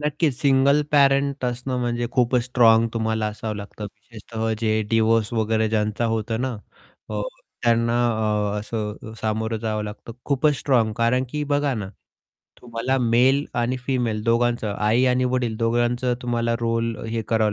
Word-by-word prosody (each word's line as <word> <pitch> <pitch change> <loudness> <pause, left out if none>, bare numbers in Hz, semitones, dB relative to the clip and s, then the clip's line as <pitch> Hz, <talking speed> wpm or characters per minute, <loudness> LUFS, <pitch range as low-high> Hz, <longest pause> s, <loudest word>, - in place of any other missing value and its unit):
नक्कीच. 150 -1 0
Single 140 +1 +4
parent 140 -1 +3
असणं 125 +1 -2
म्हणजे 120 0 -1
खूपच 125 -1 +2
स्ट्राँग 115 -2 +4
तुम्हाला 110 -1 0
असावं 105 0 -4
लागतं, 105 +1 -8
विशेषतः 110 +2 -5
जे 110 -1 +1
डिव्होर्स 115 -1 +2
वगैरे 110 -1 +1
ज्यांचा 105 +1 0
होतं 115 0 -1
ना. 130 -3 -2 0.5
अ, 105 -1 -2 0.4
त्यांना 115 0 +2 0.6
अ, 105 - -2
असं 105 0 -4 0.2
अ, - - -10
सामोरं 110 +1 -1
जावं 110 -1 -2
लागतं. 105 +2 -8
खूपच 145 +1 +2
स्ट्राँग 115 -6 +2
कारण 120 +2 +2
की 150 +1 -2
बघा 145 -1 +1
ना, 105 -4 -4 0.7
तुम्हाला 120 +2 -2
मेल 125 +4 +3
आणि 120 +2 0
फिमेल 120 -5 -1
दोघांचं, 120 -1 +1
आई 110 +4 +3
आणि 125 0 +2
वडील 125 -3 -1
दोघांचं 120 +2 +1
तुम्हाला 120 -1 0
रोल 115 0 -1
अ, - - -9
हे 115 0 -2
करावं 110 -2 +2
115 Hz, 155 wpm, -23 LUFS, 110-125 Hz, 0.7 s, Single